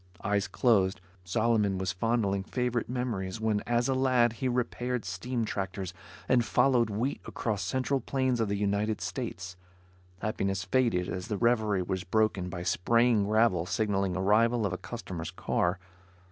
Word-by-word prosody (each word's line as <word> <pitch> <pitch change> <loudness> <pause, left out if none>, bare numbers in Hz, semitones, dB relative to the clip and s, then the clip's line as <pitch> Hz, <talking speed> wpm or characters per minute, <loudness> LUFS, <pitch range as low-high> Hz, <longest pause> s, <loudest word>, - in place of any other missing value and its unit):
Eyes 100 -1 +1
closed, 100 -2 +2 0.2
Solomon 105 +1 +1
was 95 -1 -1
fondling 100 -1 0
favorite 125 +3 -2
memories, 115 -7 -3
when 110 -2 +1
as 120 +1 +2
a 135 - +2
lad 130 -3 +3
he 130 +3 -2
repaired 125 0 -1
steam 125 -2 -2
tractors 95 -3 -4 0.3
and 125 -2 +4
followed 125 -1 +3
wheat 115 +7 -2
across 105 -4 -2
central 130 +1 0
plains 130 0 0
of 110 -2 0
the 100 - 0
United 105 +1 0
States. 95 +1 -5 0.6
Happiness 95 -2 -1
faded 105 -4 +1
as 90 +1 -4
the 105 -2 -2
reverie 110 -5 +2
was 95 +1 -3
broken 100 -2 +1
by 85 -1 -5
spraying 115 +4 +3
gravel 105 -5 +2
signaling 95 -1 0
arrival 110 +4 +3
of 95 - -1
a - - -2
customer's 95 -6 -6
car. 90 +1 0
110 Hz, 150 wpm, -29 LUFS, 95-120 Hz, 0.6 s, and